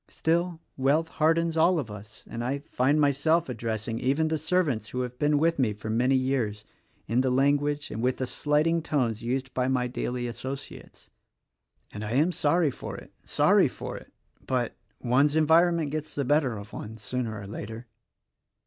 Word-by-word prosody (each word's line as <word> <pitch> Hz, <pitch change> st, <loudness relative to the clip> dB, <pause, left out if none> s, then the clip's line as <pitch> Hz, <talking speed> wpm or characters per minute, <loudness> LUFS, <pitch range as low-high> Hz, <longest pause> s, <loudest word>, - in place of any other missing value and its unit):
Still, 170 Hz, +1 st, 0 dB, 0.2 s
wealth 145 Hz, +5 st, +2 dB
hardens 165 Hz, +1 st, +2 dB
all 170 Hz, +3 st, +4 dB
of 125 Hz, -9 st, -3 dB
us; 105 Hz, 0 st, -11 dB
and 115 Hz, -, -5 dB
I 140 Hz, +3 st, -2 dB
find 140 Hz, +4 st, +2 dB
myself 150 Hz, +3 st, +2 dB
addressing 115 Hz, -1 st, -3 dB
even 145 Hz, +5 st, +1 dB
the 160 Hz, -1 st, 0 dB
servants 150 Hz, -10 st, 0 dB
who 125 Hz, +3 st, -2 dB
have 125 Hz, 0 st, -5 dB
been 150 Hz, 0 st, +3 dB
with 165 Hz, +1 st, +2 dB
me 115 Hz, -5 st, +2 dB
for 110 Hz, +1 st, -6 dB
many 125 Hz, +4 st, +2 dB
years, 125 Hz, -6 st, -1 dB, 0.4 s
in 115 Hz, +4 st, +2 dB
the 130 Hz, -, +1 dB
language, 145 Hz, +3 st, +1 dB
and 110 Hz, -, -4 dB
with 125 Hz, +1 st, +1 dB
the 130 Hz, -, -1 dB
slighting 150 Hz, +5 st, +1 dB
tones, 125 Hz, -8 st, -1 dB
used 130 Hz, +2 st, -2 dB
by 125 Hz, 0 st, 0 dB
my 130 Hz, -1 st, +1 dB
daily 125 Hz, 0 st, -3 dB
associates, 130 Hz, +3 st, -7 dB, 0.4 s
— -, -, -41 dB
and 105 Hz, -, -6 dB
I 105 Hz, +2 st, -3 dB
am 155 Hz, +7 st, +3 dB
sorry 160 Hz, -1 st, +2 dB
for -, -, -7 dB
it, -, -, -13 dB
sorry -, -, +4 dB
for -, -, -7 dB
it; -, -, -11 dB, 0.4 s
but 125 Hz, -3 st, -1 dB, 0.2 s
one's 140 Hz, +5 st, +3 dB
environment 160 Hz, 0 st, +4 dB
gets 155 Hz, 0 st, -4 dB
the 140 Hz, -, -1 dB
better 135 Hz, -4 st, +2 dB
of 100 Hz, +1 st, -10 dB
one 110 Hz, +1 st, -7 dB
sooner 110 Hz, 0 st, -3 dB
or 100 Hz, -, -8 dB
later. 110 Hz, +3 st, -7 dB
130 Hz, 180 wpm, -27 LUFS, 115-155 Hz, 0.4 s, all